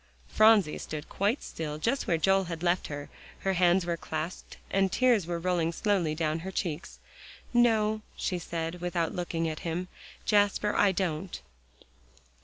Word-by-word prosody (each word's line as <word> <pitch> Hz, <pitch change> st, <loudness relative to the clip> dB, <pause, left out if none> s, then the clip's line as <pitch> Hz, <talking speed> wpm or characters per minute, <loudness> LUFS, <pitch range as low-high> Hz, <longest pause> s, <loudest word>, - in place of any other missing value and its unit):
Phronsie 215 Hz, -7 st, +4 dB
stood 150 Hz, -1 st, -6 dB
quite 205 Hz, +7 st, 0 dB
still 150 Hz, -2 st, -5 dB
just 235 Hz, -, -1 dB
where 170 Hz, -, +2 dB
Joel 195 Hz, +3 st, +3 dB
had 165 Hz, -1 st, -6 dB
left 175 Hz, +1 st, +1 dB
her; 145 Hz, -1 st, -6 dB, 0.3 s
her 195 Hz, -, +1 dB
hands 180 Hz, 0 st, +3 dB
were 170 Hz, -1 st, -1 dB
clasped 160 Hz, +2 st, -5 dB
and 195 Hz, -1 st, +2 dB
tears 240 Hz, -8 st, +3 dB
were 175 Hz, -1 st, -1 dB
rolling 170 Hz, -1 st, 0 dB
slowly 175 Hz, -4 st, 0 dB
down 155 Hz, 0 st, 0 dB
her 185 Hz, +4 st, -6 dB
cheeks. 175 Hz, -4 st, -4 dB, 0.6 s
"No," 220 Hz, -3 st, +3 dB
she 180 Hz, -2 st, -2 dB
said, 165 Hz, +1 st, -4 dB
without 175 Hz, -2 st, -1 dB
looking 170 Hz, -2 st, -2 dB
at 155 Hz, -1 st, -4 dB
him, 175 Hz, +2 st, -3 dB, 0.4 s
"Jasper, 205 Hz, 0 st, +2 dB
I 200 Hz, -, +4 dB
don't." 160 Hz, -, -2 dB
175 Hz, 155 wpm, -29 LUFS, 165-200 Hz, 0.6 s, Phronsie